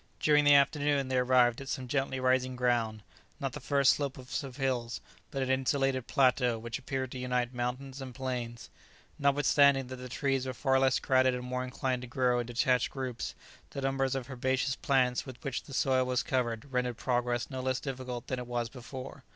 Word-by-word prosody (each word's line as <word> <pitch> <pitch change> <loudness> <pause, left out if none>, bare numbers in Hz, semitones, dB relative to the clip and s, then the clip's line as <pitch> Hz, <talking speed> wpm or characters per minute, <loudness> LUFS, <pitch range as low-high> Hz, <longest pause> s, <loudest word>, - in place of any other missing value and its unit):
During 150 -1 +4
the 145 0 +8
afternoon 140 -1 +3
they 130 -1 +2
arrived 125 -1 +3
at 135 - -7
some 130 -1 -3
gently 135 0 -1
rising 130 0 +2
ground, 120 -4 0 0.4
not 135 -4 -3
the 150 - -5
first 140 0 +4
slopes 135 -1 -3
of 135 -2 -9
hills, 125 -4 -1 0.3
but 135 -1 -2
an 130 - 0
insulated 135 -1 +1
plateau 125 -4 +3
which 115 +2 -5
appeared 130 -1 -3
to 130 - -6
unite 125 -1 -1
mountains 130 +2 -4
and 130 -2 -8
plains. 125 -3 -4 0.5
Notwithstanding 140 -1 +4
that 130 - -6
the 125 0 -8
trees 135 0 0
were 130 - -4
far 135 0 +2
less 130 -1 +3
crowded 130 -1 +3
and 125 - -5
more 125 0 -2
inclined 130 0 -2
to 125 - -7
grow 125 0 +1
in 120 - -3
detached 125 +1 +2
groups, 130 -3 -4 0.3
the 140 - -5
numbers 135 0 0
of 130 -2 -3
herbaceous 130 +1 0
plants 130 -2 +1
with 130 -2 -8
which 135 -2 -2
the - - -12
soil 130 -1 +2
was 125 -1 0
covered 125 0 -2
rendered 125 -2 0
progress 120 0 -1
no 130 -1 -3
less 130 0 0
difficult 130 -3 -5
than 130 - -3
it 125 - -6
was 120 -1 -2
before. 130 +1 -9
130 Hz, 195 wpm, -31 LUFS, 125-135 Hz, 0.5 s, the